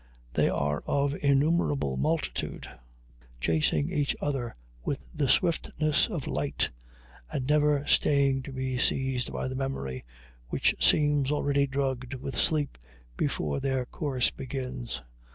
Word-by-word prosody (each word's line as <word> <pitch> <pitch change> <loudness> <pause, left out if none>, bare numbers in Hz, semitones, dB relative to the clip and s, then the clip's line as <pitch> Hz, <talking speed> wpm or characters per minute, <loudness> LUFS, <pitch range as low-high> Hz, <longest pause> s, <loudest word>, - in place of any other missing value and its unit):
They - - +3
are 75 +1 0
of 140 0 +1
innumerable 140 - +2
multitude, 160 - -1 0.7
chasing 75 0 +1
each 145 -1 +1
other 135 -5 -2 0.3
with - - -4
the 140 - 0
swiftness 155 -1 +2
of - - -4
light, - - 0 0.6
and 130 - -2
never 150 -1 +3
staying 140 -3 +3
to - - -7
be 130 -1 -2
seized 130 -2 +1
by - - -2
the 130 - -4
memory, 100 - -3 0.4
which - - +2
seems 145 -2 +4
already 140 -1 +2
drugged 135 -2 -2
with 130 +1 -5
sleep 150 - +1 0.4
before 70 +3 -1
their 130 -2 0
course 130 -2 0
begins. 125 - -5
135 Hz, 125 wpm, -28 LUFS, 125-145 Hz, 0.7 s, seems